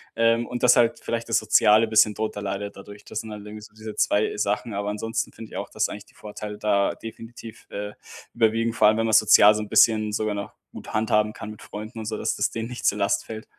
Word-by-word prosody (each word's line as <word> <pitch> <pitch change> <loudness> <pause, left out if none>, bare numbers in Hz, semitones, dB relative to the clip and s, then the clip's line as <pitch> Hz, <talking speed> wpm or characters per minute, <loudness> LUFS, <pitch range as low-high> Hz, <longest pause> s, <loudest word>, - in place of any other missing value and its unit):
Ähm, 115 +1 +2
und 125 - -5
dass 125 -1 +6
halt 115 -1 +3
vielleicht 115 0 -3
das - - +2
Soziale 105 +2 +4
bisschen 110 -1 +4
drunter 110 -1 -4
leidet 100 0 -5
dadurch. 100 +1 -12
Das - - -5
sind 110 - -8
halt 105 -1 -9
irgendwie 105 0 -9
so 105 - -14
diese 110 0 -8
2 105 +1 +1
Sachen, 105 +2 -1
aber 100 +1 -3
ansonsten 115 +2 -3
finde 110 0 -11
ich - - -7
auch, - - -5
dass - - -1
eigentlich - - -8
die - - -24
Vorteile 105 0 -8
da 100 -2 +1
definitiv, 115 0 -11
äh, 105 0 -5 0.4
überwiegen, 115 0 +1
vor 110 - +4
allem, 110 - +4
wenn 115 - 0
man 115 - 0
sozial 105 0 +7
so 110 - -3
'n 105 - -6
bisschen 110 0 +3
sogar 110 0 -1
noch 100 0 -6 0.2
gut - - -10
handhaben 105 0 +1
kann 110 - -8
mit 110 - -12
Freunden 110 +2 -8
und 110 - -6
so, 110 0 -3
dass - - -1
das - - +1
denen 115 0 -5
nicht 125 - -7
zur 100 - +3
Last 100 0 0
fällt. 110 -1 -8
110 Hz, 245 wpm, -24 LUFS, 105-115 Hz, 0.4 s, sozial